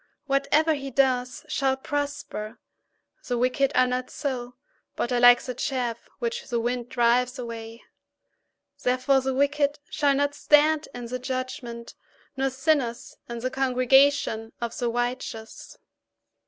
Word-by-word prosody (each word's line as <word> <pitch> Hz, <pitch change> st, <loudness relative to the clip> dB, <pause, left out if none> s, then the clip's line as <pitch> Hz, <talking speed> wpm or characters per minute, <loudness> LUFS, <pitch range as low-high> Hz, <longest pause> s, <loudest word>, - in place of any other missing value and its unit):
Whatever 295 Hz, +3 st, +2 dB
he 275 Hz, -2 st, -5 dB
does 255 Hz, -1 st, +1 dB
shall 265 Hz, -1 st, 0 dB
prosper. 285 Hz, -6 st, -4 dB, 0.7 s
4The 245 Hz, -, -2 dB
wicked 255 Hz, +3 st, +2 dB
are 255 Hz, -, +5 dB
not 250 Hz, 0 st, -2 dB
so, 250 Hz, -4 st, -4 dB, 0.4 s
but 240 Hz, -, -2 dB
are 245 Hz, -, +2 dB
like 245 Hz, 0 st, +7 dB
the 250 Hz, -, -4 dB
chaff 245 Hz, -2 st, -3 dB
which 475 Hz, 0 st, -3 dB
the 240 Hz, -2 st, -1 dB
wind 240 Hz, +1 st, -2 dB
drives 245 Hz, 0 st, +2 dB
away. 230 Hz, -1 st, -7 dB, 1.0 s
5Therefore 255 Hz, +2 st, +2 dB
the 265 Hz, 0 st, -1 dB
wicked 285 Hz, +1 st, +1 dB
shall 285 Hz, -2 st, +2 dB
not 285 Hz, +1 st, +1 dB
stand 300 Hz, +1 st, +3 dB
in 245 Hz, -1 st, -6 dB
the 250 Hz, +2 st, -4 dB
judgment, 250 Hz, -2 st, -5 dB, 0.4 s
nor 270 Hz, 0 st, 0 dB
sinners 265 Hz, -3 st, -1 dB
in 235 Hz, -1 st, -5 dB
the 255 Hz, +1 st, -2 dB
congregation 260 Hz, -3 st, +3 dB
of 235 Hz, -1 st, -4 dB
the 240 Hz, -2 st, -1 dB
righteous. 240 Hz, -2 st, -4 dB
255 Hz, 135 wpm, -26 LUFS, 240-275 Hz, 1.0 s, like